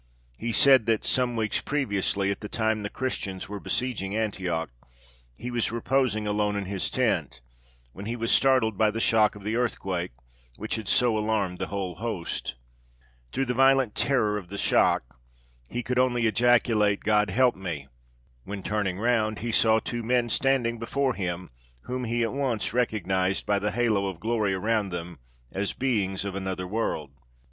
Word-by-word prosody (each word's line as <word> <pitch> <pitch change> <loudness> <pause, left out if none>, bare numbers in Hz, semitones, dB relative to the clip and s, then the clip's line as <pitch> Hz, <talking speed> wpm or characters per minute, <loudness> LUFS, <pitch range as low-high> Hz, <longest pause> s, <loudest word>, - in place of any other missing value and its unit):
He 115 - -3
said 130 -1 +6
that, 110 -2 +2
some 125 -2 +1
weeks 110 -2 0
previously, 100 -7 0
at 100 - -4
the 105 - -7
time 110 -1 0
the 100 - -4
Christians 100 -8 -3
were 105 0 -6
besieging 105 -4 -2
Antioch, 90 - -2 0.6
he 125 - -6
was 120 -3 0
reposing 120 -2 0
alone 105 0 0
in 100 -1 -2
his 95 0 -1
tent, - - 0 0.5
when 100 +2 -8
he 115 - -2
was 115 -1 -1
startled 130 -6 +3
by 110 -1 +5
the 110 +2 -3
shock 110 -2 +3
of 105 - -11
the 110 +2 -1
earthquake, 95 -7 -1 0.5
which 110 - -5
had 110 -3 -6
so 120 -3 +4
alarmed 105 -4 -1
the - - -2
whole 95 -2 -3
host. 90 - -4 0.8
Through 135 - 0
violent 135 -1 +3
terror 110 -7 +1
of 90 - -12
the 100 - -6
shock - - +2 0.5
he 120 - -3
could 125 +1 0
only 120 -2 +2
ejaculate, 110 -3 +3
God 105 -1 +2
help 125 +5 +3
me! 85 -8 -5 0.6
when 100 -1 -6
turning 100 -3 -1
round 110 -1 +1
he 115 +3 -3
saw 110 0 +4
two 120 +1 -4
men 120 +1 +1
standing 120 -3 +1
before 130 +3 0
him, 90 - -4 0.3
whom 125 - -4
he 120 +1 0
at 115 - -1
once 130 -7 -1
recognised 95 -6 0
by 100 -1 +2
the 105 +1 -1
halo 105 -3 +1
of 95 -4 -5
glory 110 -2 0
around 105 +1 0
them 85 -3 -6 0.3
as 100 +1 -2
beings 100 -7 -1
of 100 - -3
another 95 -1 -3
world. 90 -8 -2
110 Hz, 170 wpm, -26 LUFS, 100-120 Hz, 0.8 s, said